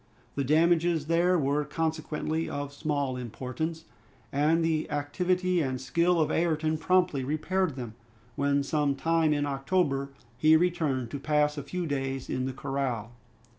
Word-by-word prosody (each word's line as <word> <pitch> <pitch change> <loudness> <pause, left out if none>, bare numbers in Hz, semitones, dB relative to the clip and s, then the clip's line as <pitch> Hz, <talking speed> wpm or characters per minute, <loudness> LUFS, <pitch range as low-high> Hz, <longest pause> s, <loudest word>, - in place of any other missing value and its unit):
The 140 - -1
damages 165 +2 +3
there 170 +3 +3
were 145 0 +1
consequently 160 +1 -2
of 145 0 -4
small 145 -3 -1
importance, 130 +7 -4 0.5
and 155 +4 +2
the 160 -1 0
activity 180 +5 0
and 130 -3 -2
skill 170 +6 +2
of 155 - +2
Ayrton 160 -2 +1
promptly 180 -7 +2
repaired 155 +4 -1
them, 120 -4 -6 0.4
when 140 0 +1
some 145 -1 +1
time 165 +2 +2
in 145 -1 +1
October 140 0 0 0.3
he 155 +2 +6
returned 155 -8 0
to 140 - -4
pass 150 +1 +1
a 145 - -4
few 175 +6 -4
days 135 -3 -3
in 130 0 -1
the 135 - -3
corral. 125 -5 -3
150 Hz, 145 wpm, -28 LUFS, 140-165 Hz, 0.5 s, he